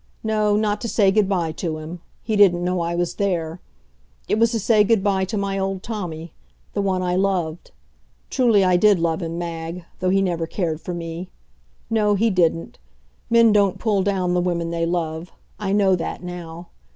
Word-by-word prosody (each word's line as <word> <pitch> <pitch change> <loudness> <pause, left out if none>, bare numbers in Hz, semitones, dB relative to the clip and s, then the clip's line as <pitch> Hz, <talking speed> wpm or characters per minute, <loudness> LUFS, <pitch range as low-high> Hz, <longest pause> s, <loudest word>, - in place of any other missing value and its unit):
No, 215 -1 +1
not 210 0 0
to 235 - -3
say 200 -2 +3
good 205 -1 +2
by 175 -5 0
to 160 0 -4
him. 160 +3 -8 0.2
He 215 -1 -1
didn't 180 -4 +5
know 180 0 0
I 170 0 -2
was 175 0 -1
there. 175 -4 -1 0.7
It 215 - +1
was 230 0 +4
to 225 - 0
say 215 0 +4
good 210 -1 +2
by 195 -2 +1
to 210 +3 -4
my 195 -1 -1
old 195 -1 -2
Tommy; 175 -8 -6 0.4
the 205 - 0
one 190 -2 0
I 180 0 0
loved. 180 -4 -1 0.6
Truly 230 -7 +4
I 180 -1 +4
did 205 +1 +5
love 165 +1 0
him, 165 0 -4
Mag, 170 0 -5
though 185 - 0
he 195 +1 +3
never 170 -3 -1
cared 165 -4 -2
for 180 - -5
me. 170 +1 -6 0.6
No, 210 -2 +2
he 225 +3 +2
didn't. 165 -3 0 0.5
Men 230 -1 +5
don't 200 -2 +3
pull 205 -1 +1
down 185 -2 0
the 180 - +2
women 170 -2 -1
they 165 0 -1
love; 165 0 -3 0.3
I 200 -2 -2
know 195 -2 +3
that 170 +1 -5
now. 175 -1 -8
185 Hz, 195 wpm, -22 LUFS, 170-205 Hz, 0.7 s, didn't